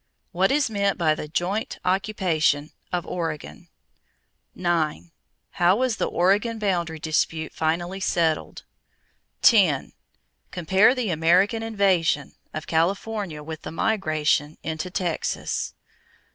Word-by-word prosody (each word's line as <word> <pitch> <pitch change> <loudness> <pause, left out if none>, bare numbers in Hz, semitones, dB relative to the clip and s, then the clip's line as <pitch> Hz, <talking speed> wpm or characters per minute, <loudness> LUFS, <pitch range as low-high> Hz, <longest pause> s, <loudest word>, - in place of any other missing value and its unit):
What 190 +1 +2
is 290 0 +2
meant 200 -3 0
by 160 -3 +3
the 155 - -6
"joint 185 +7 -2
occupation" 180 -6 +1 0.2
of 175 -2 -2
Oregon? 155 - -5 0.9
9. 170 -2 -1 0.4
How 175 +2 +3
was 245 -1 0
the - - 0
Oregon 205 +6 +1
boundary 175 -6 -1
dispute 160 0 -1
finally 175 +4 -1
settled? 165 -4 0 0.8
10. 185 - +4 0.6
Compare 190 +7 +3
the 240 -7 -1
American 180 +8 +3
"invasion" 190 -10 +1 0.2
of 155 0 -6
California 175 0 -1
with 160 +1 -7
the - - -7
migration 155 -6 0
into 160 +3 -4
Texas. 175 -3 -2
175 Hz, 110 wpm, -24 LUFS, 160-200 Hz, 0.9 s, 10